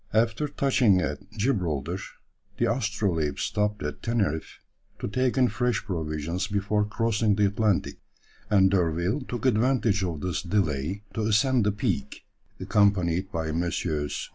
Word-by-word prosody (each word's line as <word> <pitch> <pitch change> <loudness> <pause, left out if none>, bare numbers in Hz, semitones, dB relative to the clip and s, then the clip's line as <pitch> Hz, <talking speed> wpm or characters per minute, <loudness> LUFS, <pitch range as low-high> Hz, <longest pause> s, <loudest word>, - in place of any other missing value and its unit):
After 115 +6 +2
touching 130 -9 +3
at - - -2
Gibraltar, 90 - -1 0.6
the 120 - +2
Astrolabe 100 - -1
stopped 105 -2 -1
at 75 - -4
Teneriffe 100 -10 -1 0.4
to - - -4
take 130 +4 0
in 130 -1 +5
fresh 125 -4 -1
provisions 85 0 -3
before 105 +1 0
crossing 110 0 +1
the 105 0 +3
Atlantic, 105 -1 0 0.5
and 95 -2 +5
D'Urville 90 - +1
took 120 -2 -5
advantage 115 -4 +2
of 85 -5 -3
this 90 0 -2
delay 90 -1 -1
to 110 - -2
ascend 120 +1 +3
the - - +3
peak, 105 - -3 0.3
accompanied 95 -2 +2
by 80 -3 -2
Messrs. 80 -3 -2
100 Hz, 135 wpm, -26 LUFS, 85-110 Hz, 0.6 s, in